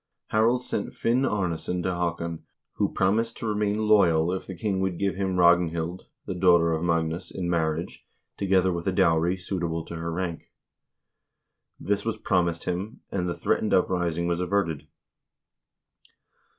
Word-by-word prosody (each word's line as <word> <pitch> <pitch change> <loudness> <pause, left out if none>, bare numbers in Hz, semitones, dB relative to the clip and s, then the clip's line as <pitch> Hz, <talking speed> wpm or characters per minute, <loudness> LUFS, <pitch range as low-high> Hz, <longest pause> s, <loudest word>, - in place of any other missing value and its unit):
Harald 115 +3 +2
sent - - -3
Finn 125 +4 +1
Arnesson 90 -4 -1
to 95 - 0
Haa 85 -1 -1
kon, 85 -1 -5 0.3
who - - +1
promised 110 +5 +1
to - - -6
remain 105 -1 0
loyal 90 -6 +4
if 95 - -5
the 95 - -7
king 95 +1 -1
would 95 -2 -1
give 100 +1 0
him 95 -1 -2
Ragn 85 -1 +5
hild, 85 +2 -4 0.2
the - - -3
daughter 85 -2 +4
of 80 +1 -2
Magnus, 85 +1 -1
in 90 -2 -4
marriage, 80 -1 -1 0.3
together 95 -2 +2
with 85 +1 -4
a - - +3
dowry 85 0 +2
suitable 85 -3 -3
to 85 - -7
her 85 0 -3
rank. 85 -1 -4 1.3
This 100 0 -1
was 115 -1 -2
promised 85 -5 0
him, 95 +6 -4
and 90 -2 -1
the 85 - -2
threatened - - +1
uprising 85 -2 +1
was 85 0 0
averted. 90 -5 -1
90 Hz, 160 wpm, -26 LUFS, 85-100 Hz, 1.3 s, Ragn